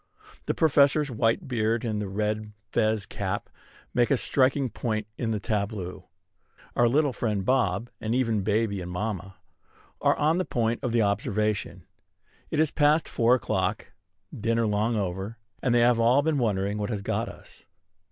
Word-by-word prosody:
The - - 0
Professor's 145 -2 +3
white 115 +1 +1
beard 115 -2 0
and 105 -3 -3
red 105 0 -2 0.2
fez 110 -3 +1
cap 100 0 -4 0.4
make 120 -1 +3
a 140 - +3
striking 130 0 +1
point 110 -1 -2
in 115 - -2
the 110 -2 -1
tableau. 100 -3 -3 0.7
Our 120 - +4
little 140 +2 +2
friend 105 -6 -1
Bob, 120 -3 +1
and 110 +2 -1
even 115 -5 +1
baby 105 -1 0
and 90 - -6
mamma, 95 0 -4 0.7
are - - +3
on 160 +4 +2
the - - +1
point 115 -1 0
of 120 -2 -1
observation. 105 -1 0 0.6
It 155 - -1
is 155 -1 +3
past 150 +2 +3
four 120 +2 +3
o'clock, 130 - -2 0.4
dinner 115 +1 0
long 105 +2 +1
over; 95 +2 -3 0.2
and 125 - +1
they 120 0 +4
have 120 0 +4
all 125 +5 +4
been 155 -2 +1
wondering 105 -3 0
what 105 - -2
has 105 -4 -3
got - - -1
us. - - -14
110 Hz, 160 wpm, -27 LUFS, 105-125 Hz, 0.7 s, Our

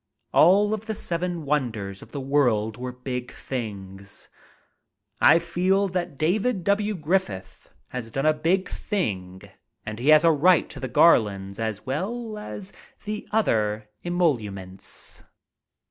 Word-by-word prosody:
All 200 +5 +5
of 220 +1 -4
the 220 - -2
seven 175 -3 -3
wonders 110 -9 -2
of - - -14
the 145 - -4
world 125 -6 +1
were 125 +2 -5
big 125 0 -5
things. 100 -5 -7 0.9
I - - +7
feel 185 +4 +1
that 175 -5 -3
David 195 - +1
W. 205 +2 +1
Griffith 150 - -2 0.2
has 125 -3 -5
done 135 +5 -2
a 155 - +5
big 170 +5 +1
thing 95 - -3 0.4
and 110 +1 -5
he 130 +5 +1
has 155 0 +7
a 165 - +6
right 170 +4 +4
to 140 - -9
the 130 - -3
garlands 100 -9 +3
as 110 -2 -3
well 215 - -3
as 205 -2 -8 0.3
the 210 0 -5
other 110 - +1
emoluments. 110 - -3
145 Hz, 135 wpm, -25 LUFS, -, 0.9 s, I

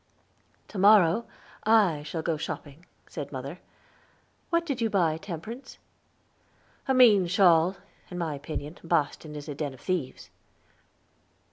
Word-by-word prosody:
"To 205 - -6
morrow, 205 +1 +5 0.4
I 210 -9 +4
shall 160 +2 -5
go 165 - 0
shopping," 155 +1 -7 0.2
said 145 -4 -7
mother. 140 +5 -6 0.9
"What 335 0 +1
did 275 -6 -3
you 225 - +1
buy, 170 -6 +1
Temperance?" 200 - -8 1.1
"A 265 - +3
mean 215 -8 +6
shawl. 180 0 +4 0.3
In 180 - -7
my 165 -3 -2
opinion, 145 +2 -6
Boston 155 -2 -1
is 145 0 -8
a 150 - -4
den 140 -2 -4
of - - -18
thieves." 170 -9 -3
170 Hz, 130 wpm, -27 LUFS, 150-205 Hz, 1.1 s, mean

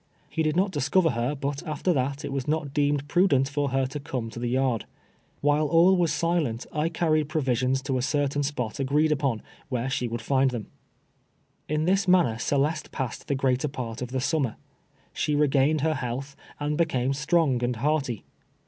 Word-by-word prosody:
lie 160 - +1
did 155 -1 +1
not 190 +2 +2
discover 165 +2 +2
her, 120 +5 -1
but 140 0 -3
after 155 +4 0
that 140 +1 -1
it - - -4
was 135 -2 -3
not 150 -2 -1
deemed 145 -1 +1
prudent 145 -5 +3
for 140 0 -1
her 135 0 +1
to 135 +3 -5
come 130 -5 -4
to 120 - -7
the 120 0 -2
yard. 130 -3 +1 0.6
When 145 +1 +3
all 165 +5 +5
was 175 -4 +2
silent 155 -7 0
I 155 +1 0
carried 155 -3 +1
j)rovisions 130 -3 0
to 135 -1 -1
a - - -1
certain 145 +1 0
spot 135 -6 -3
agreed 150 +3 +2
upon, 135 -7 0 0.3
where 125 0 -2
she 125 -2 -1
would 115 0 -4
iind 135 +3 +2
them. 120 -4 -6 1.0
In 155 +1 0
this 195 +2 +2
manner 170 -12 +4
Celeste 150 +4 0
passed 130 -4 -4
the 140 - 0
greater 130 +1 +1
part 125 -5 -5
of 125 - -2
the 130 +1 -2
summer. 135 -3 0 0.6
She 150 - 0
regained 145 +1 +3
her 160 +1 +2
health, 135 +1 -4 0.2
and 150 +1 -1
became 135 -5 +1
strong 145 -3 +1
and 120 0 0
hearty. 135 -2 -1
140 Hz, 185 wpm, -26 LUFS, 130-155 Hz, 1.0 s, all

